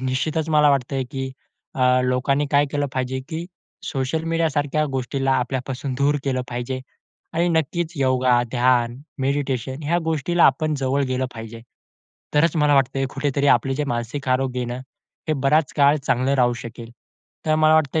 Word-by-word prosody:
तर -, -, -9 dB
निश्चितच 155 Hz, +5 st, -1 dB
मला 150 Hz, -1 st, +5 dB
वाटतंय 135 Hz, -1 st, 0 dB
की 135 Hz, -1 st, -4 dB, 0.4 s
अ, 125 Hz, -1 st, +3 dB
लोकांनी 135 Hz, +3 st, +1 dB
काय 145 Hz, 0 st, +4 dB
केलं 145 Hz, 0 st, 0 dB
पाहिजे 130 Hz, 0 st, -2 dB
की 165 Hz, +2 st, -4 dB, 0.4 s
सोशल 140 Hz, +4 st, -2 dB
मीडियासारख्या 155 Hz, -3 st, 0 dB
गोष्टीला 135 Hz, +1 st, 0 dB
आपल्यापासून 130 Hz, +1 st, -2 dB
दूर 145 Hz, +1 st, +3 dB
केलं 130 Hz, -2 st, 0 dB
पाहिजे 125 Hz, +2 st, -4 dB, 0.5 s
आणि 170 Hz, +2 st, +2 dB
नक्कीच 165 Hz, +1 st, 0 dB
योगा, 130 Hz, -2 st, +3 dB
ध्यान, 120 Hz, -1 st, +2 dB, 0.2 s
मेडिटेशन 135 Hz, 0 st, -2 dB
ह्या 170 Hz, +4 st, +1 dB
गोष्टीला 165 Hz, +2 st, +2 dB
आपण 155 Hz, +3 st, +3 dB
जवळ 135 Hz, +1 st, 0 dB
गेलं 130 Hz, 0 st, -1 dB
पाहिजे. 115 Hz, 0 st, -8 dB, 0.7 s
तरच 165 Hz, +3 st, +3 dB
मला 150 Hz, -1 st, +4 dB
वाटतंय 135 Hz, 0 st, +2 dB
कुठेतरी 140 Hz, 0 st, 0 dB
आपले 135 Hz, +3 st, -1 dB
जे 150 Hz, +1 st, -1 dB
मानसिक 120 Hz, +2 st, -3 dB
आरोग्य 130 Hz, 0 st, 0 dB
आहे 120 Hz, -, -2 dB
ना, 120 Hz, -, -4 dB, 0.5 s
हे 155 Hz, -, +3 dB
बराच 150 Hz, +2 st, +3 dB
काळ 145 Hz, +1 st, +5 dB
चांगलं 130 Hz, +3 st, +2 dB
राहू 125 Hz, -2 st, +3 dB
शकेल. 115 Hz, 0 st, -9 dB, 0.6 s
तर 155 Hz, -, +3 dB
मला 155 Hz, 0 st, +5 dB
वाटतंय 155 Hz, 0 st, +2 dB
135 Hz, 160 wpm, -22 LUFS, 130-150 Hz, 0.7 s, मला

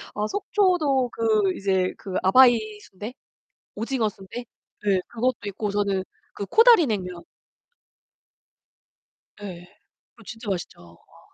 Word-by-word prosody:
아 210 Hz, 0 st, -1 dB
속초도 350 Hz, -, +1 dB
그 215 Hz, -4 st, +1 dB
이제 190 Hz, -2 st, 0 dB
그 190 Hz, -2 st, -7 dB
아바이 240 Hz, +4 st, +6 dB, 0.2 s
순대? 210 Hz, +6 st, -9 dB, 0.6 s
오징어 225 Hz, 0 st, -1 dB
순대? 205 Hz, +5 st, -9 dB, 0.4 s
네. 195 Hz, -2 st, +2 dB
그것도 240 Hz, +1 st, -1 dB
있고 200 Hz, +1 st, -3 dB
저는 200 Hz, -2 st, 0 dB, 0.3 s
그 200 Hz, -, -5 dB
코다리 455 Hz, -, +6 dB
냉면 180 Hz, -6 st, -4 dB, 2.2 s
예. 180 Hz, -4 st, -8 dB, 0.5 s
그거 -, -, -17 dB
진짜 225 Hz, -2 st, -7 dB
맛있죠. 180 Hz, -3 st, -4 dB, 0.2 s
와. -, -, -23 dB
215 Hz, 215 characters per minute, -24 LUFS, 195-255 Hz, 2.2 s, 아바이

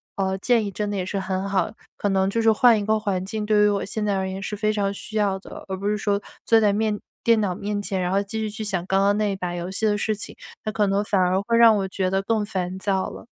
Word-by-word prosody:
呃， 190 Hz, -1 st, -1 dB
建 235 Hz, +3 st, +2 dB
议 -, -, -2 dB
真 210 Hz, +1 st, -3 dB
的 -, -, -2 dB
也 185 Hz, -, -1 dB
是 195 Hz, +1 st, -2 dB
很 190 Hz, +1 st, -2 dB
好， 190 Hz, -3 st, +1 dB, 0.3 s
可 205 Hz, -, -1 dB
能 190 Hz, 0 st, +2 dB
就 230 Hz, -, -1 dB
是 225 Hz, 0 st, +5 dB
换 235 Hz, -1 st, +5 dB
一 205 Hz, -, -3 dB
个 215 Hz, 0 st, +2 dB
环 195 Hz, -4 st, -1 dB
境， 215 Hz, +2 st, -4 dB
对 210 Hz, -1 st, +4 dB
于 210 Hz, -, +6 dB
我 200 Hz, -1 st, 0 dB
现 210 Hz, +1 st, -3 dB
在 205 Hz, -, +1 dB
而 190 Hz, 0 st, -2 dB
言 190 Hz, +1 st, -5 dB
是 210 Hz, -, -3 dB
非 215 Hz, +1 st, 0 dB
常 200 Hz, -1 st, 0 dB
需 215 Hz, +2 st, -6 dB
要 200 Hz, -2 st, +1 dB
的， -, -, -10 dB
而 190 Hz, -, -3 dB
不 200 Hz, +2 st, -3 dB
是 210 Hz, -, +1 dB
说 205 Hz, -1 st, 0 dB, 0.2 s
坐 225 Hz, -, +5 dB
在 210 Hz, -2 st, +3 dB
面 215 Hz, 0 st, 0 dB, 0.2 s
电 230 Hz, -1 st, +4 dB
脑 185 Hz, -4 st, -1 dB
面 205 Hz, +1 st, -3 dB
前， 195 Hz, -2 st, -2 dB
然 180 Hz, 0 st, -1 dB
后 195 Hz, -, +2 dB
继 205 Hz, +2 st, -5 dB
续 215 Hz, -1 st, -2 dB
去 220 Hz, +1 st, -5 dB
想 190 Hz, -4 st, -2 dB
刚 195 Hz, 0 st, +2 dB
刚 200 Hz, +1 st, +3 dB
那 210 Hz, -1 st, +1 dB
一 -, -, -2 dB
把 180 Hz, -2 st, -4 dB
游 175 Hz, +1 st, -4 dB
戏 210 Hz, +3 st, -1 dB
的 210 Hz, -1 st, +2 dB
事 215 Hz, +1 st, 0 dB
情， 210 Hz, -, -8 dB, 0.3 s
那 215 Hz, -, -2 dB
可 210 Hz, -1 st, +1 dB
能 195 Hz, +1 st, +1 dB
反 205 Hz, -2 st, +1 dB
而 185 Hz, +1 st, +2 dB
会 230 Hz, +3 st, +1 dB
让 230 Hz, -2 st, +7 dB
我 195 Hz, -1 st, -1 dB
觉 185 Hz, 0 st, -1 dB
得 195 Hz, +1 st, +1 dB
更 215 Hz, +1 st, 0 dB
烦 185 Hz, -3 st, -3 dB
躁 190 Hz, -1 st, 0 dB
了。 -, -, -10 dB
200 Hz, 325 characters per minute, -23 LUFS, 190-215 Hz, 0.3 s, 让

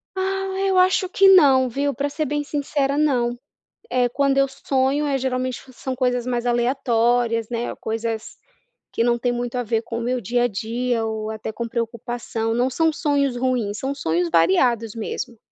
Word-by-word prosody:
Ah, 385 Hz, 0 st, -1 dB, 0.2 s
eu 380 Hz, -1 st, +2 dB
acho 370 Hz, 0 st, +3 dB
que 390 Hz, +1 st, +5 dB
não, 270 Hz, -9 st, +6 dB
viu, 280 Hz, +3 st, -1 dB
pra 285 Hz, +1 st, -2 dB
ser 305 Hz, +1 st, -2 dB
bem 295 Hz, +1 st, -1 dB
sincera 285 Hz, -1 st, -1 dB
não. 245 Hz, -5 st, +1 dB, 0.5 s
Eh, 250 Hz, -1 st, +2 dB
quando 275 Hz, +1 st, +1 dB
eu 275 Hz, 0 st, +4 dB
sonho 270 Hz, +2 st, 0 dB
é 275 Hz, -1 st, +1 dB
geralmente 255 Hz, -1 st, -2 dB
são 255 Hz, +1 st, -5 dB
coisas 250 Hz, -1 st, 0 dB
mais 245 Hz, -1 st, -1 dB
aleatórias, 240 Hz, -2 st, +1 dB
né, 235 Hz, 0 st, -3 dB
coisas 225 Hz, 0 st, -4 dB, 0.6 s
que 230 Hz, -, 0 dB
não 240 Hz, 0 st, +2 dB
tem 245 Hz, 0 st, 0 dB
muito 240 Hz, 0 st, -3 dB
a 245 Hz, -, 0 dB
ver 225 Hz, 0 st, -1 dB
com 230 Hz, 0 st, -5 dB
o -, -, -3 dB
meu 250 Hz, +1 st, -1 dB
dia 240 Hz, +4 st, 0 dB
a -, -, +2 dB
dia 230 Hz, +3 st, -2 dB
ou 220 Hz, 0 st, -3 dB
até 220 Hz, 0 st, -5 dB
com 235 Hz, +1 st, -4 dB
preocupação, 230 Hz, -1 st, -3 dB
não 250 Hz, +2 st, +2 dB
são 320 Hz, +4 st, +2 dB
sonhos 285 Hz, -5 st, 0 dB
ruins 240 Hz, -5 st, -1 dB
são 275 Hz, +1 st, -2 dB
sonhos 170 Hz, -, 0 dB
variados 210 Hz, +7 st, +2 dB
mesmo. 230 Hz, +1 st, -5 dB
245 Hz, 180 wpm, -22 LUFS, 230-275 Hz, 0.6 s, não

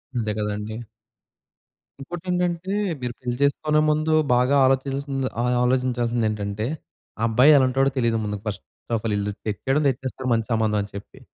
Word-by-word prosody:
అంతే 110 Hz, -3 st, -1 dB
కదండీ. 105 Hz, +1 st, -3 dB, 1.2 s
ఇంకోటేంటంటే 180 Hz, +3 st, -2 dB, 0.3 s
మీరు 120 Hz, -1 st, -3 dB
పెళ్లి 125 Hz, -1 st, -3 dB
చేసుకునే 150 Hz, +2 st, +2 dB
ముందు 155 Hz, +1 st, +1 dB, 0.2 s
బాగా 125 Hz, +3 st, +3 dB
ఆలోచించాల్సిది 135 Hz, 0 st, 0 dB
ఆహ్, 125 Hz, 0 st, +1 dB
ఆలోచించాల్సిందేటంటే 115 Hz, -5 st, 0 dB, 0.5 s
ఆ -, -, -5 dB
అబ్బాయి 125 Hz, +7 st, +6 dB
ఎలాంటాడో 135 Hz, +1 st, +3 dB
తెలియదు 115 Hz, -2 st, +2 dB
ముందుకు 105 Hz, -1 st, -4 dB
ఫస్ట్ 100 Hz, -3 st, -4 dB, 0.3 s
ఆఫ్ 110 Hz, -, -3 dB
ఆల్ 105 Hz, -, 0 dB
ఈళ్ళు 100 Hz, 0 st, -1 dB
తెచ్చేయడం 135 Hz, +8 st, 0 dB
తెచ్చేస్తారు 130 Hz, 0 st, -3 dB
మంచి 115 Hz, -1 st, 0 dB
సంబంధం 110 Hz, -1 st, +1 dB
అని 100 Hz, -, -6 dB
చెప్పి. 100 Hz, -, -10 dB
125 Hz, 140 wpm, -23 LUFS, 110-135 Hz, 1.2 s, అబ్బాయి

